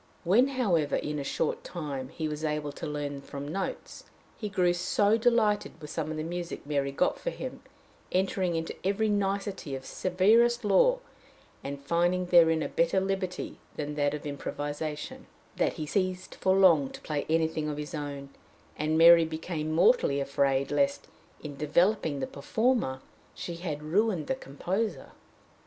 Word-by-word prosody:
When, 215 +10 +4
however, 200 - +1
in 150 0 -2
a - - -3
short 145 +2 -2
time, 140 -6 -5
he 160 +2 -4
was 150 0 -5
able 150 -1 -1
to 155 - -6
learn 145 -1 -4
from 140 0 -7
notes, 190 +5 -5 0.3
he 210 - -5
grew 180 -3 +2
so 200 +4 +2
delighted 225 -6 +1
with 150 -1 -9
some 155 -1 -3
of 155 - -4
the 155 - -2
music 175 0 -5
Mary 140 -2 -1
got 135 - 0
for - - -2
him, - - -7 0.5
entering 185 -1 0
into 165 0 -3
every 200 +3 +1
nicety 195 -6 -1
of 130 0 -8
severest 220 - +3
law, 210 - +4 0.7
and 140 0 -5
finding 175 +3 +1
therein 165 -3 +5
a - - -1
better 170 +3 +2
liberty 190 -1 -3 0.2
than 150 -1 -4
that 145 0 0
of 150 - -8
improvisation, 145 +1 -5 0.3
that - - +1
he 155 - -5
ceased 185 +2 -2
for 190 0 +1
long 170 -8 +5
to - - -11
play 150 -2 -3
anything 160 -1 +1
of 150 - -4
his 150 +1 -6
own, 140 -2 -5 0.5
and 155 +1 0
Mary 165 0 +8
became 160 -1 -4
mortally 165 - +4
afraid 140 -1 +1
lest, 280 0 0 0.3
in 145 -2 -6
developing 155 +1 +1
the - - 0
performer, 145 - 0 0.3
she 170 -1 -6
had 155 -4 -4
ruined 185 +1 +1
the - - 0
composer. 195 - -3
165 Hz, 160 wpm, -29 LUFS, 150-195 Hz, 0.7 s, Mary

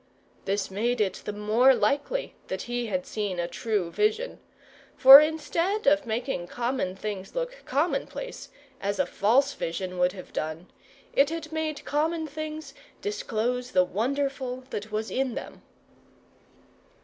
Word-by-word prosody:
This 195 0 -1
made 235 +5 0
it 200 -3 0
the - - -2
more 220 +6 +4
likely 290 - 0
that 190 0 -4
he 240 0 -3
had 275 +4 -2
seen 205 -7 -3
a 170 - 0
true 180 0 -2
vision; 435 - 0 0.6
for 270 +2 +12
instead 320 +6 0
of 290 -1 +4
making 225 -5 -2
common 235 -4 -2
things 195 -1 -6
look - - -3
commonplace, 300 - -2 0.3
as 200 0 -1
a - - +2
false 265 +7 +2
vision 180 -1 -4
would 180 0 +3
have 185 -2 -11
done, 155 +3 -4 0.4
it 280 +1 +4
had 325 -1 -5
made 315 -2 -3
common 315 +2 0
things 310 -1 -6 0.3
disclose 250 - -2
the 185 -1 +5
wonderful 260 +5 -2
that 210 +1 -5
was 215 +1 -2
in 260 -2 -1
them. - - -7
250 Hz, 140 wpm, -27 LUFS, 205-300 Hz, 0.6 s, for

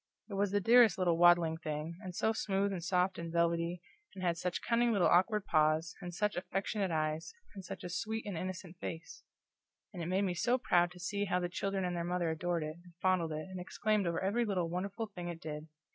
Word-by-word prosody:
It - - -4
was 200 0 +1
the 205 +1 +2
dearest 230 -1 +6
little 180 -3 +2
waddling 170 -1 +5
thing, 155 +1 -5
and 185 -4 -7
so 220 - +1
smooth 200 -2 0
and 175 -3 -4
soft 180 +1 +1
and 170 0 -5
velvety, 170 +1 0 0.3
and 185 - -6
had 170 -2 +2
such 180 +1 -3
cunning 235 0 +2
little 200 -5 +3
awkward 195 +4 +3
paws, 155 0 +2
and 175 -1 -5
such 210 +4 0
affectionate 195 +2 -1
eyes, 155 - -2 0.2
and 195 -2 -8
such - - -7
a - - -3
sweet 220 +6 -3
and 205 -3 -4
innocent 180 0 -5
face; 165 0 -6 0.7
and 180 - -5
it 165 - -3
made 190 +3 +1
me 185 -2 0
so 240 +8 +2
proud 175 -7 +3
to 180 - -13
see 200 +3 -1
how 180 -2 +1
the 175 -1 -2
children 195 +1 -1
and 180 0 -2
their 170 - -1
mother 175 -1 0
adored 170 0 -1
it, 155 +1 -5
and 175 -1 -17
fondled 180 -3 +2
it, 155 +2 -4
and 185 - -5
exclaimed 205 +2 0
over 170 -1 0
every 205 +5 +1
little 185 -6 -1
wonderful 200 +5 -3
thing 180 -5 -7
it 170 -1 -5
did. 155 -1 -6
180 Hz, 225 wpm, -33 LUFS, 170-195 Hz, 0.7 s, dearest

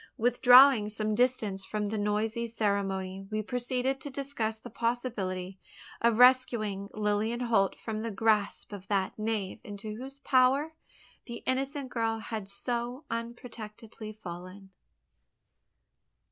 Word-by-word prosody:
Withdrawing 245 -1 +7
some 215 0 -1
distance 215 -5 +1
from 210 +2 -3
the 220 - -2
noisy 215 +3 0
ceremony, 195 -3 -1
we 215 0 -2
proceeded 250 +3 -1
to 285 - -6
discuss 265 -5 -3
the 240 +1 -11
possibility 205 -6 -2 0.4
of 235 -1 +3
rescuing 235 -6 +4
Lilian 215 +3 0
Holt 225 -5 +2
from 220 -1 -4
the 230 - -3
grasp 210 0 0
of 195 -2 -8
that 195 -2 0
knave 215 -3 -2
into 210 +1 -7
whose 270 +3 -8
power 275 +3 +3 0.5
the 235 -1 -8
innocent 270 +1 -2
girl 225 -1 0
had 220 -3 -5
so 240 +6 -2
unprotectedly 230 -2 -7
fallen. 185 +1 -9
220 Hz, 120 wpm, -30 LUFS, 205-245 Hz, 0.5 s, Withdrawing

